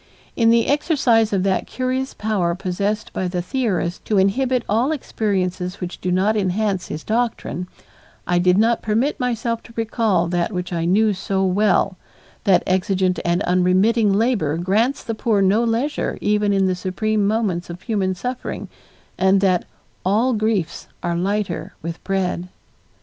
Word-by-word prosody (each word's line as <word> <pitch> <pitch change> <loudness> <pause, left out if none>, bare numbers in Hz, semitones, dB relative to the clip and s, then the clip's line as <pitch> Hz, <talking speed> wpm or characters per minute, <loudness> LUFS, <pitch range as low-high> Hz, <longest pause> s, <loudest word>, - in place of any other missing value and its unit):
In 230 -1 +3
the 230 0 +4
exercise 265 -7 +2
of 195 -2 +1
that 190 -1 0
curious 260 +1 -2
power 195 -6 0
possessed 200 +4 -2
by 185 - -1
the 180 0 -2
theorist 185 -4 -2
to 210 - +1
inhibit 245 +6 +2
all 235 +8 +1
experiences 190 - -2
which 180 -1 -6
do 180 - -1
not 195 +4 +2
enhance 195 -1 0
his 155 - -6
doctrine, 220 -7 -2 0.6
I 175 0 +2
did 180 +1 +3
not 230 +2 +3
permit 230 +8 0
myself 235 -2 -1
to 230 - -16
recall 220 -6 +1
that 175 +2 0
which 180 -2 -4
I 165 -1 -1
knew 210 +4 +3
so 190 0 -1
well 195 0 +2 0.5
that 190 -3 +4
exigent 185 0 +1
and 175 +3 +1
unremitting 190 +5 +3
labor 200 - +1
grants 215 +10 +1
the 230 - -3
poor 215 -1 +1
no 195 +4 +3
leisure 235 +6 -1
even 210 0 +1
in 195 -1 +2
the 185 - +2
supreme 200 +3 -1
moments 200 -6 -1
of 170 +1 -8
human 195 -5 -1
suffering 250 +7 -5 0.5
and 190 +1 +4
that 185 -3 +2 0.4
"all 220 +7 +2
griefs 215 -6 -1 0.2
are 175 -1 -1
lighter 190 0 -2
with 165 +1 -6
bread." 185 -2 -1
200 Hz, 155 wpm, -21 LUFS, 180-225 Hz, 0.6 s, the